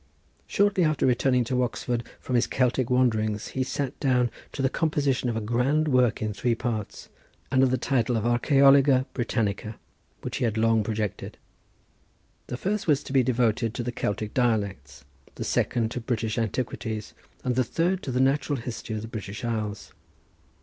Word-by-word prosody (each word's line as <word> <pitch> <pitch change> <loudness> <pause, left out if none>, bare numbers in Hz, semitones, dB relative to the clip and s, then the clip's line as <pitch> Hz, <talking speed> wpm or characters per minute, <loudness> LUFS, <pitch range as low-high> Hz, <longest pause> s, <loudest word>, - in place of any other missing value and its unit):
Shortly 200 -2 +2
after 155 -3 +2
returning 125 0 +3
to 125 +2 0
Oxford 120 -1 -2 0.2
from 130 - -5
his 120 - +3
Celtic 125 -1 +1
wanderings 110 -4 +1
he 130 - -3
sat 135 +1 -3
down 125 -4 +2 0.2
to 135 - -4
the - - +4
composition 140 -5 0
of 115 - -2
a - - -2
grand 125 +8 +1
work 125 -5 +2
in 110 -1 -2
three 120 +3 0
parts, 110 -3 -4 0.4
under 130 0 +4
the 130 +1 +1
title 125 -2 +1
of 110 - -2
Archæologia 135 +2 +5
Britannica, 110 -4 -2 0.4
which - - -4
he - - -2
had 115 -2 0
long 115 0 +3
projected. 105 -2 -3 1.1
The 125 - -4
first 200 +7 -2
was 145 -2 +3
to - - -7
be 135 - +5
devoted 115 -2 +1
to 120 - -2
the 120 - -2
Celtic 105 -2 -3
dialects; 100 - -1 0.3
the - - -4
second 115 -2 0
to 125 - -4
British 115 -1 -2
Antiquities, 110 -1 -3 0.3
and 125 - 0
the 130 - +3
third 175 +9 0
to 130 - -4
the 125 - 0
natural 140 +2 +2
history 115 -2 -5
of 105 - -4
the - - -6
British 110 0 -6
Isles. 110 -3 -3
120 Hz, 170 wpm, -26 LUFS, 110-130 Hz, 1.1 s, Archæologia